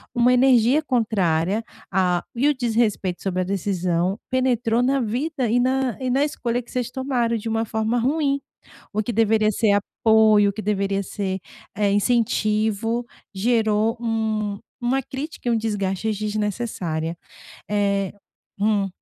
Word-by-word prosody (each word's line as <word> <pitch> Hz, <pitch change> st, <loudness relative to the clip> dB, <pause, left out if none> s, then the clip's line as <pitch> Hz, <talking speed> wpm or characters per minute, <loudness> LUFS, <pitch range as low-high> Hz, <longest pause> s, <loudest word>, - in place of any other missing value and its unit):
uma 245 Hz, +1 st, +4 dB
energia 250 Hz, +2 st, +4 dB
contrária, 210 Hz, -, +1 dB, 0.3 s
ah, 180 Hz, -2 st, +1 dB
e 255 Hz, +5 st, +2 dB
o 295 Hz, -, +4 dB
desrespeito 225 Hz, -7 st, 0 dB
sobre 185 Hz, -2 st, -1 dB
a -, -, -1 dB
decisão 185 Hz, 0 st, -1 dB
penetrou 245 Hz, -2 st, +1 dB
na 270 Hz, +2 st, +2 dB
vida 255 Hz, +4 st, -1 dB
e 245 Hz, -, +3 dB
na 260 Hz, -1 st, +1 dB
e 255 Hz, -, -2 dB
na 270 Hz, +3 st, +2 dB
escolha 245 Hz, -5 st, -2 dB
que 240 Hz, -, -17 dB
vocês 250 Hz, -2 st, -2 dB
tomaram, 250 Hz, -3 st, -1 dB
de 220 Hz, -, -6 dB
uma 225 Hz, 0 st, 0 dB
forma 220 Hz, +2 st, 0 dB
ruim. 280 Hz, +2 st, +1 dB, 0.5 s
O 215 Hz, -, 0 dB
que 240 Hz, -, -2 dB
deveria 215 Hz, 0 st, +3 dB
ser 215 Hz, 0 st, +2 dB, 0.3 s
apoio, 215 Hz, -2 st, +6 dB
o -, -, -3 dB
que 215 Hz, -, -5 dB
deveria 200 Hz, -1 st, 0 dB
ser, 190 Hz, 0 st, -3 dB, 0.4 s
eh, 205 Hz, -1 st, +1 dB
incentivo, 220 Hz, +1 st, +1 dB, 0.3 s
gerou 220 Hz, +1 st, +1 dB
um 220 Hz, -3 st, -1 dB, 0.3 s
uma 265 Hz, +3 st, +2 dB
crítica 270 Hz, +1 st, -7 dB
e -, -, +3 dB
um 230 Hz, -, +3 dB
desgaste 210 Hz, -1 st, -1 dB
desnecessária, 205 Hz, -6 st, -2 dB, 0.5 s
eh 200 Hz, -2 st, 0 dB, 0.4 s
hum. 205 Hz, -1 st, +1 dB
220 Hz, 145 wpm, -23 LUFS, 200-245 Hz, 0.5 s, apoio